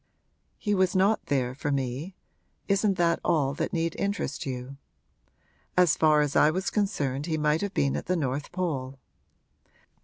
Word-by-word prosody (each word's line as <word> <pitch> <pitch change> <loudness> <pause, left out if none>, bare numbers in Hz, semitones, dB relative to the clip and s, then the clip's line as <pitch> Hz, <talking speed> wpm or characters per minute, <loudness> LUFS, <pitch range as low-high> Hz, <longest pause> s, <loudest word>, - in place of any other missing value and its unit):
He 205 - -1
was 185 -1 +2
not 195 +4 +2
there 130 -4 0
for 145 +2 -3
me 135 +6 -3 0.5
isn't 200 0 +2
that 170 -1 +2
all 145 -5 +1
that - - -2
need 165 -3 -1
interest 200 -9 -2
you? 130 +1 -5 1.0
As 180 -3 +5
far 155 -1 +4
as 145 -1 -1
I 150 - +6
was 185 +5 -2
concerned 150 -9 -1
he 160 -2 0
might 150 +1 +1
have 200 -1 -3
been 140 -1 +1
at - - -4
the 185 - +1
North 140 -1 -2
Pole. 140 -8 -3
155 Hz, 160 wpm, -27 LUFS, 140-185 Hz, 1.0 s, I